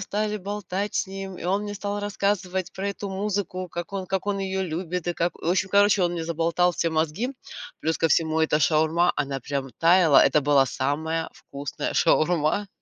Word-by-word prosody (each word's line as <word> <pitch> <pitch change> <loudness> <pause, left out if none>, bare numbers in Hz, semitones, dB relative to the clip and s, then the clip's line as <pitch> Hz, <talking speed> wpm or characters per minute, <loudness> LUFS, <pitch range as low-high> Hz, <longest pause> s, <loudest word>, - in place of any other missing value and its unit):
стали 210 +1 -2
болтать 200 0 -4
с - - 0
ним. 195 -1 -7
И - - -9
он 195 +3 +1
мне 205 0 -5
стал 205 +1 -3
рассказывать 195 -2 -1
про 195 +1 -3
эту 200 0 -5
музыку, 190 -2 -3
как 175 +3 -6
он 190 -2 -4
как 190 +1 -2
он 200 -1 0
ее 190 0 -2
любит 180 0 -3
и 175 - +1
как, 170 0 -1
в - - -5
общем, 190 +2 +1
короче, 200 0 +4
он 175 -1 +1
мне 170 -2 -3
заболтал 170 +2 +1
все 165 - 0
мозги. 160 - -1 0.5
Плюс 160 +1 -1
ко 165 - +2
всему, 160 0 +2
эта 155 -1 +2
шаурма, 160 +3 +3
она 140 -2 -2
прям 135 0 -4
таяла. 165 -3 +6
Это 145 +2 +3
была 145 -1 +4
самая 160 +5 -2
вкусная 140 -1 -5
шаурма. 170 +4 +2
180 Hz, 190 wpm, -25 LUFS, 160-195 Hz, 0.5 s, таяла